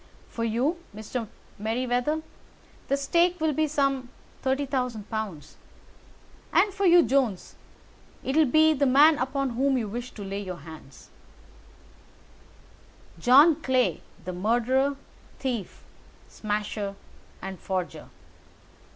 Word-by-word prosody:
For 230 - -4
you, 250 +10 0 0.2
Mr. 220 +2 -5 0.3
Merryweather, 245 +7 -1 0.6
the 275 - +1
stake 340 +5 +2
will 315 -1 +1
be 310 +2 +1
some 275 -3 0
£ - - -15 0.3
30,000; 260 -5 -1 1.5
and 410 - +3
for 395 -1 +1
you, 350 0 +7
Jones, 255 -10 0 0.7
it 265 - -2
will 315 -2 +5
be 315 +4 +5
the 280 -1 +1
man 290 +4 +6
upon 270 0 -1
whom 265 +3 +1
you 225 -4 -2
wish 240 +4 -5
to 205 - -8
lay 195 +1 -4
your 185 -3 -6
hands." 155 -3 -13 2.1
"John 285 - +6
Clay, 255 -2 +1 0.2
the 185 - -4
murderer, 245 +8 +1 0.4
thief, 245 -7 -4 0.4
smasher, 210 -1 -3 0.4
and 190 -1 -7
forger. 185 -2 -4
255 Hz, 115 wpm, -26 LUFS, 215-285 Hz, 2.1 s, you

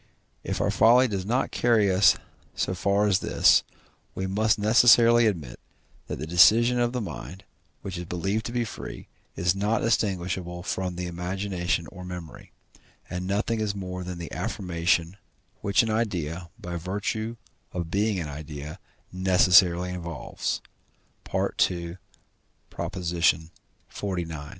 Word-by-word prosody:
If - - -3
our - - +1
folly 125 +3 +5
does 100 -4 -4
not 125 +4 0
carry 110 -5 +3
us 95 +2 +5 0.4
so - - -1
far 100 +3 +1
as 100 -2 +3
this, - - +4 0.5
we 95 - -3
must 105 +3 +1
necessarily 115 +2 +6
admit, 80 - -3 0.5
that - - -4
the 75 - -5
decision 115 +9 +5
of 120 0 +1
the 125 - -2
mind, 95 -1 -7 0.4
which 95 -3 -5
is 90 - -6
believed 95 +6 -2
to - - -6
be 120 -1 -1
free, - - -8 0.3
is 90 0 +1
not 105 +3 0
distinguishable 90 -5 -1
from 95 -1 -3
the 90 +1 -4
imagination 90 0 -2
or 90 -1 -10
memory, 90 -3 -9 0.6
and 90 +1 -3
is - - -5
nothing 110 +1 0
more 90 -2 -5
than 90 -1 -6
the 85 -1 -7
affirmation, 90 -3 -1 0.4
which 100 +3 +3
an 110 - -1
idea, 90 -6 -2
by 85 0 -5
virtue 105 +6 -3 0.3
of 85 -2 -4
being 100 0 +1
an 80 - -4
idea, 75 0 -8 0.3
necessarily 90 -1 +4
involves 85 -3 -4 0.7
(II. 85 0 0 0.8
xlix.). 85 -2 0
95 Hz, 135 wpm, -26 LUFS, 85-105 Hz, 0.8 s, necessarily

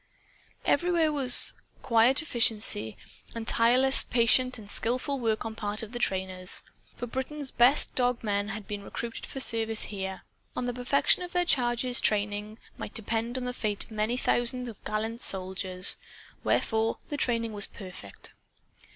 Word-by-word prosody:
Everywhere 345 -3 +2
was 265 -4 +3 0.3
quiet 240 +5 +4
efficiency 215 - 0 0.4
and 230 0 -6
tirelessly 255 +4 +4
patient 255 +2 +3
and 215 -2 -12
skillful 255 +6 0
work 225 -3 -1
on 225 - -4
the 225 - -14
part 210 +1 -3
of 220 - -9
the 240 - -5
trainers. 185 -4 0 0.3
For - - -5
Britain's 265 +3 -5
best 250 +4 +4
dog 245 -1 0
men 205 -1 -1
had 215 -1 -7
been 205 -1 -5
recruited 230 +3 -6
for 270 - -7
service 225 -3 +3
here. 190 -2 -5 0.3
On 250 - -3
the 245 - -2
perfection 250 +7 +2
of 355 -1 -7
their 355 0 +2
charges' 245 -4 +1
training 210 +1 -1 0.2
might - - -7
depend 225 +2 -1
the 250 -1 -3
fate 210 -4 -3
of - - -19
many 215 +3 -1
thousand 245 -1 -1
gallant 220 +2 -3
soldiers. 185 -1 +3 0.5
Wherefore, 225 0 0
the 295 - -3
training 230 -4 +1
was 205 -1 +2
perfect. 180 - -10
230 Hz, 150 wpm, -28 LUFS, 210-250 Hz, 0.5 s, quiet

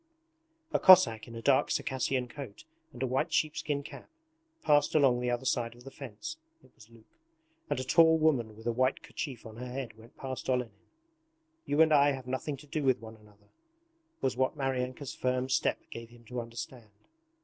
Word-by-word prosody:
A - - +3
Cossack 180 -14 +7
in 115 - -10
a 115 - -7
dark 140 -2 +4
Circassian 130 -1 -1
coat 125 -5 -9 0.3
and 125 +2 -6
a - - +2
white 130 +1 0
sheepskin 150 -2 0
cap - - -11 0.5
passed 145 0 +3
along 135 -5 +4
the 125 0 -1
other 120 +2 -2
side 120 -2 0
of 120 - -16
the 135 - -10
fence 120 - -8 0.3
(it - - -21
was 110 0 -18
Luke), 115 -1 -19 0.6
and - - 0
a - - -2
tall 160 +4 +5
woman 130 -9 +1
with 110 - -13
a 120 - +1
white 130 +3 0
kerchief 130 -7 -6
on 110 0 -10
her 125 +1 -6
head 125 -4 -5
went 115 +2 -17
past 130 -1 -5
Olenin. 125 -4 0 0.9
'You 145 +2 +3
and 160 -1 +5
I 145 -1 +5
have 130 -2 -7
nothing 130 +3 -3
to 145 - -14
do 150 +1 -3
with 130 -2 +2
one 115 0 -10
another' 105 -1 -22 0.7
was 130 - 0
what 130 +4 0
Maryanka's 130 0 -2
firm 130 0 -1
step - - +1
gave 115 -1 -8
him 120 0 -18
to 125 -1 -3
understand. 115 0 -8
130 Hz, 195 wpm, -30 LUFS, 115-140 Hz, 0.9 s, Cossack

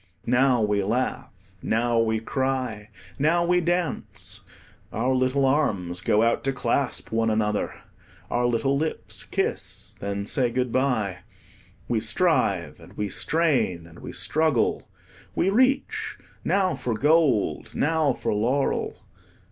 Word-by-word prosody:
Now 125 -1 +3
we 105 -1 +1
laugh, 120 +6 -1 0.3
now 115 +1 +1
we 110 -1 +1
cry, 125 -3 -2 0.3
now 170 +4 +3
we 180 +1 +3
dance; 175 -3 -2 0.5
our 125 +4 0
little 130 +2 +2
arms 100 - 0
go 105 +4 +3
out 115 0 +2
to 135 - +2
clasp 130 +1 -1
one 115 0 +1
another, 105 -1 0 0.6
our 120 0 +2
little 120 +4 +1
lips 155 +3 -2
kiss, - - -3
then 100 0 -3
say 125 +3 +1
good 125 0 -1
bye. 115 -9 0 0.7
We - - +1
strive, - - +1
and - - -14
we 105 -1 -3
strain, 140 - +1
and 85 0 -14
we - - -7
struggle. 155 -6 +1 0.5
We 190 - +2
reach 260 +5 +1 0.3
now 190 -2 +2
for 120 -2 -2
gold, 145 -4 +2
now 155 -1 +2
for 120 - -2
laurel. 125 +7 0
125 Hz, 130 wpm, -25 LUFS, 110-145 Hz, 0.7 s, Now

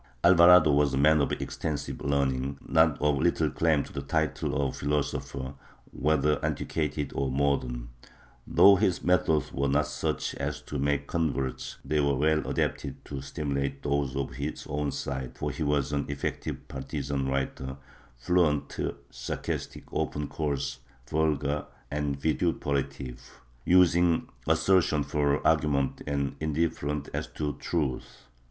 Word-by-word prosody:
Alvarado 85 -2 +8
was 70 -1 +3
a - - 0
man 75 +2 +5
of 70 - 0
extensive 75 -3 -4
learning, 70 -1 0
but 80 -2 +4
of 75 -2 +2
little - - +2
claim 80 -3 +2
to - - -12
the 70 - -3
title 75 -1 -1
of 70 -2 0
philosopher, 70 -2 -2 0.4
whether 75 0 +1
antiquated 75 -2 -2
or 70 0 -1
modern. 65 -3 0 0.6
Though 100 0 +7
his 95 -3 +1
methods 80 -4 +2
were 70 +1 0
not 70 +2 +2
such - - -2
as - - -3
to 75 - -5
make 70 0 +1
converts, 70 -5 -2
they 75 +2 +1
were 70 -1 +2
well 75 +3 +2
adapted - - -2
to 70 -2 -5
stimulate 70 -1 -3
those 70 -2 0
of 70 -1 -2
his 70 +2 -5
own 75 0 -1
side, 65 -1 -4
for - - -2
he - - -7
was 70 -2 +1
an 70 -1 -1
effective 70 -1 -4
partizan 70 0 -3
writer, 65 0 -2 0.4
fluent, 75 0 +1 0.4
sarcastic, - - -4
often 75 0 -1
coarse, 70 -3 -2 0.3
vulgar 75 -2 0 0.2
and 70 -1 -2
vitupera 70 -3 0
tive, 65 -3 -10 0.3
using 85 -2 +4 0.2
assertion 90 -6 +3
for 70 0 0
argument 75 -4 +2
and 70 -1 -1
indifferent 75 -2 -1
as - - -2
to 75 -1 -3
truth. 75 -7 -3
70 Hz, 135 wpm, -28 LUFS, 70-75 Hz, 0.6 s, Alvarado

